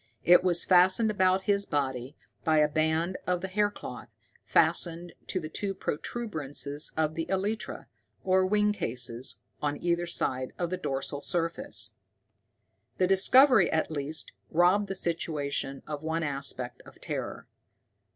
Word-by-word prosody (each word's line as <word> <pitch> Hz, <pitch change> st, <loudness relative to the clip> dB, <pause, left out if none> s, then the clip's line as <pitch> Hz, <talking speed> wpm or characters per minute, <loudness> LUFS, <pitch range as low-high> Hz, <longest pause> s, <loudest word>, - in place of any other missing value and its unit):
It 180 Hz, +1 st, +6 dB
was 175 Hz, -2 st, +2 dB
fastened 185 Hz, +4 st, +5 dB
about 190 Hz, -1 st, +2 dB
his 200 Hz, 0 st, +2 dB
body 135 Hz, -1 st, -2 dB, 0.3 s
by 160 Hz, -1 st, +3 dB
a 150 Hz, 0 st, +5 dB
band 160 Hz, +4 st, 0 dB
of 180 Hz, -1 st, 0 dB
the 190 Hz, -, -3 dB
hair 205 Hz, +2 st, +1 dB
cloth, -, -, -9 dB, 0.3 s
fastened 170 Hz, 0 st, +2 dB
to 185 Hz, -, -1 dB
the 155 Hz, -, -6 dB
two 195 Hz, +5 st, -3 dB
protuberances 150 Hz, -, -2 dB
of 155 Hz, -1 st, +1 dB
the 165 Hz, 0 st, -3 dB
elytra, 200 Hz, +4 st, -2 dB, 0.4 s
or 190 Hz, 0 st, +3 dB
wing 210 Hz, +2 st, +2 dB
cases, 125 Hz, -, -2 dB, 0.2 s
on 145 Hz, 0 st, -1 dB
either 175 Hz, +1 st, 0 dB
side 130 Hz, -6 st, -1 dB
of 175 Hz, -1 st, -2 dB
the 185 Hz, -, -1 dB
dorsal 140 Hz, -3 st, -3 dB
surface. 165 Hz, 0 st, -1 dB, 1.0 s
The 185 Hz, -, +3 dB
discovery 210 Hz, +3 st, +6 dB
at 160 Hz, 0 st, 0 dB
least 150 Hz, +1 st, -3 dB, 0.2 s
robbed 180 Hz, +5 st, +3 dB
the 195 Hz, -, -4 dB
situation 145 Hz, -5 st, -2 dB
of 150 Hz, -1 st, -5 dB
one 160 Hz, +1 st, -2 dB
aspect 135 Hz, -4 st, -3 dB
of -, -, -16 dB
terror. -, -, -5 dB
170 Hz, 140 wpm, -28 LUFS, 145-190 Hz, 1.0 s, It